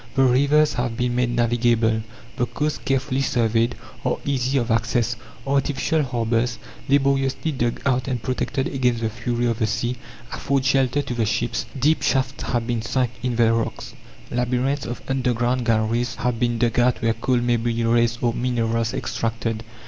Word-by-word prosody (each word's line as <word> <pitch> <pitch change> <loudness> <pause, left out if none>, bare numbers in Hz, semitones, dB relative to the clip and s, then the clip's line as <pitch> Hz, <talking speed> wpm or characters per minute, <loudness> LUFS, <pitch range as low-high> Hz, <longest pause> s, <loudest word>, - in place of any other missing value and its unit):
The 135 - +4
rivers 140 +4 +4
have 120 -2 -2
been 125 0 0
made 125 0 +1
navigable; 120 -2 +2 0.3
the 120 - 0
coasts, 150 0 -2
carefully 135 0 0
surveyed, 115 -2 +1 0.3
are - - 0
easy 135 -1 0
of 120 -2 0
access; 115 +1 +1 0.3
artificial 140 +2 +1
harbours, 120 -2 0 0.3
laboriously 135 +2 +2
dug 120 -4 -1
out 130 -2 +1
and 130 -2 -1
protected 130 +4 -2
against 125 -3 0
the 110 -1 -1
fury 120 +2 -2
of 115 -1 0
the 110 - +2
sea, 120 +2 -1 0.4
afford 135 -1 0
shelter 135 +1 +2
to 125 - -4
the 115 -3 0
ships. 120 +2 -1
Deep 155 +5 +3
shafts 135 0 0
have 120 -2 -1
been 120 -2 -1
sunk 125 +1 0
in 125 -2 -1
the 115 -1 +4
rocks; 115 0 -3 0.4
labyrinths 125 +3 0
of 120 - -6
underground 125 -1 0
galleries 115 +2 +1
have 125 -2 -1
been 120 -1 +1
dug 120 +1 +1
out 120 0 +3
where 115 0 +3
coal 125 +3 0
may 120 0 +2
be 115 0 -1
raised 115 +1 +2
or 120 -1 +2
minerals 115 -2 0
extracted. 115 0 -2
120 Hz, 170 wpm, -23 LUFS, 115-130 Hz, 0.4 s, The